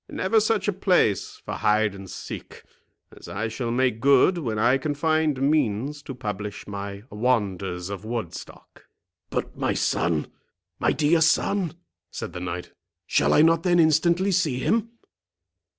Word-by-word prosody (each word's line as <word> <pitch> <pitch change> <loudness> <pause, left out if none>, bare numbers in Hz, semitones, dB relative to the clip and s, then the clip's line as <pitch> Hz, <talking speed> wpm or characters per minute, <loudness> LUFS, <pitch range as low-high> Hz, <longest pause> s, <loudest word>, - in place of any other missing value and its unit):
Never 195 +4 +2
such 215 -2 0
a 205 - +2
place 180 - +1
for - - -4
hide 105 -1 +2
and 95 -1 -10
seek, - - -8 0.5
as - - -13
I 110 +3 -3
shall 120 +1 -4
make 125 -1 +1
good 140 +7 +4
when 115 -8 -3
I 120 +5 +3
can 145 +2 -2
find 155 -2 +1
means 140 -1 0
to 135 -2 -8
publish 105 -4 -5
my 100 0 -6
Wonders 100 -5 -1
of 100 0 -6
Woodstock." 110 -6 -7 0.4
"But, - - -3
my - - -1
son—my 80 -3 -2
dear 160 +2 +2
son," 170 +1 +2 0.3
said - - -6
the 90 - -5
knight, 90 0 -5 0.3
"shall - - +2
I 150 - +6
not 165 0 +4
then 175 0 +3
instantly 170 +4 +3
see 165 -8 +1
him! 225 - 0
130 Hz, 150 wpm, -25 LUFS, 105-165 Hz, 0.5 s, I